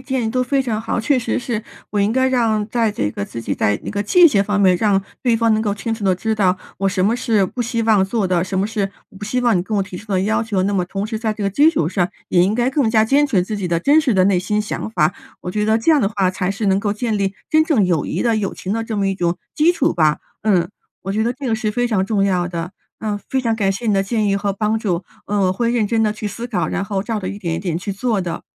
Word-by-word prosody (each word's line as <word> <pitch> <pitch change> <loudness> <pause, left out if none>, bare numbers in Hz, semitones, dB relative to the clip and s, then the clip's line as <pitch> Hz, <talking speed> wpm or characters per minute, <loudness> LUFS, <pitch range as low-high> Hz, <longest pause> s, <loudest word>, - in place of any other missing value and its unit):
建 260 -4 -1
议 220 - -1
都 255 - 0
非 270 +2 +1
常 220 -4 -2
好， 225 +1 -2
确 260 +4 +2
实 245 - -1
是， 235 -3 -3 0.3
我 210 - -1
应 200 +2 +2
该 260 +1 +2
让 225 -4 +1
在 230 0 +1
这 105 - -2
个 100 - -4
自 115 - -7
己 - - -3
在 105 0 +1
那 - - -5
个 205 - -2
界 340 - +6
限 200 -8 +2
方 205 0 0
面， 185 -2 +5
让 200 0 +2 0.2
对 235 -2 +3
方 230 0 +2
能 215 - +1
够 205 -2 -1
清 215 +3 -4
楚 220 -2 -4
地 190 -1 +3
知 220 +4 -2
道 185 -3 +2 0.2
我 195 +1 +1
什 185 -1 0
么 220 +4 +2
是 225 -5 +2
不 245 +7 -5
希 230 -1 -1
望 215 -4 +4
做 200 0 -1
的， 180 -1 +1
什 190 0 -4
么 190 - +1
是 205 -2 -2 0.2
我 - - -18
不 205 - -6
希 250 +4 -1
望 235 -6 +3
你 - - +1
跟 210 +4 -3
我 195 - +2
提 190 -1 -8
出 210 +1 -7
的 185 - +2
要 215 +3 +1
求， 205 -4 -1
那 200 +2 0
么 185 -2 +1
同 195 +2 -4
时 220 0 -3
在 220 -1 -1
这 210 - -6
个 200 - 0
基 290 +10 +5
础 230 - +1
上 180 -1 0 0.2
也 175 0 +4
应 200 - +1
该 245 +2 +1
更 270 -4 +1
加 220 -1 +4
坚 280 +6 +3
持 205 -10 +2
自 210 +3 -4
己 195 - -3
的 170 -1 0
真 290 - +4
实 270 -7 +1
的 185 - +4
内 195 -2 +3
心 210 +4 -1
想 210 - -4
法， 155 -8 +1 0.3
我 180 - -5
觉 210 +3 -1
得 220 +1 +3
这 225 +8 +2
样 305 -3 +5
的 200 - +2
话 195 -3 0
才 185 0 -2
是 200 +2 -2
能 190 0 +3
够 205 0 -1
建 215 0 -2
立 195 0 -1 0.2
真 315 0 +4
正 275 - +2
友 170 -5 0
谊 - - -2
的、 230 -2 +2
友 200 -2 -2
情 190 - -4
的 225 0 -1
这 220 -2 -4
么 195 -1 +1
一 195 - -2
种 175 -1 0 0.2
基 325 +3 +4
础 330 -5 +1
吧。 155 -3 +2 0.2
嗯， 195 -5 +2 0.3
我 195 - -3
觉 220 +2 0
得 240 - 0
这 260 0 -5
个 220 - +1
是 215 -1 -2
非 245 +1 0
常 200 -5 +1
重 205 -2 +1
要 180 -3 +1
的， 170 0 -4 0.3
嗯， 210 -2 -2
非 265 - +1
常 230 -3 0
感 195 -3 +1
谢 225 +4 -5
你 215 - +3
的 195 - +3
建 215 +2 -1
议 195 - +2
和 200 0 -1
帮 215 +2 0
助， 185 -5 -1 0.2
呃， 205 0 0
我 185 - +2
会 235 +5 0
认 230 -3 +1
真 225 0 +1
地 210 - +1
去 215 -1 -5
思 230 +4 -6
考， 200 -8 -1
然 195 - -2
后 195 -2 -2
照 220 0 -2
着 185 - -4
一 200 - -5
点 170 -5 -3
一 165 - -2
点 175 -3 -2
去 200 +3 -5
做 215 0 -1
的。 175 -2 -4
210 Hz, 330 characters per minute, -19 LUFS, 190-230 Hz, 0.3 s, 界